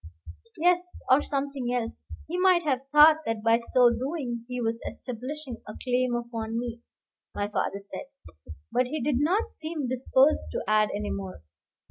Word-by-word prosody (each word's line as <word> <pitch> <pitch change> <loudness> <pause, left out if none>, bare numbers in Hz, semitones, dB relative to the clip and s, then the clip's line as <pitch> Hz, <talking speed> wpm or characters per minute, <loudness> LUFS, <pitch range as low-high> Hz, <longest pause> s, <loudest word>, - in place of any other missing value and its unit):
"Yes; 355 +2 +1
or 265 +3 +7
something 275 -3 -2
else. 240 -2 -4 0.2
He 355 +3 -3
might 365 -2 +4
have 270 -3 -1
thought 300 +1 +8
that 225 -1 -2
by 230 0 +4
so 240 +1 +4
doing 250 -3 -3
he 250 0 -4
was 230 0 -1
establishing 255 +1 -6
a 215 - -7
claim 250 -1 +1
upon 230 -1 -4
me," 235 -1 -4 0.5
my 205 - -1
father 205 -1 -1
said; 200 +7 -8 0.6
but 250 0 +2
he 305 +4 -3
did 260 -1 0
not 365 +10 +1
seem 310 -4 -4
disposed 260 +3 +2
to - - -2
add 215 0 +3
any 205 0 -3
more. 190 - -6
250 Hz, 160 wpm, -27 LUFS, 230-295 Hz, 0.6 s, thought